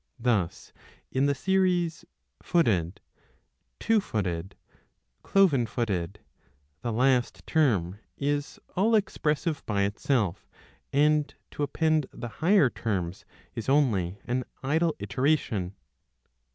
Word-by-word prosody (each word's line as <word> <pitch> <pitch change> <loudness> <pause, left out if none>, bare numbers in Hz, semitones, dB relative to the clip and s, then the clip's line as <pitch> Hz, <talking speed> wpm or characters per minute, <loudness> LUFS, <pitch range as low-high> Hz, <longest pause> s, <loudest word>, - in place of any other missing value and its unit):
Thus 115 -8 -1 0.4
in 135 +2 +2
the 140 - +1
series 180 -1 +1 0.4
Footed, 100 - +1 0.8
Two 225 -2 +3
footed, 95 - -3 0.7
Cloven 155 -12 +3
footed,^ 105 -3 -3 0.6
the 120 - -2
last 125 +1 +1
term 105 - +1 0.2
is 145 0 -2 0.2
all 220 +5 +3
expressive 160 -6 0
by 100 -2 +1
itself, 105 -1 -1 0.4
and 150 0 +3 0.2
to - - -6
append 155 0 +1
the 120 - -7
higher 165 - +5
terms 95 -5 -3 0.3
is 115 - -4
only 105 -11 +2
an 125 +1 -1 0.2
idle 160 +4 +1
iteration. 100 - 0
130 Hz, 100 wpm, -27 LUFS, 100-155 Hz, 0.8 s, higher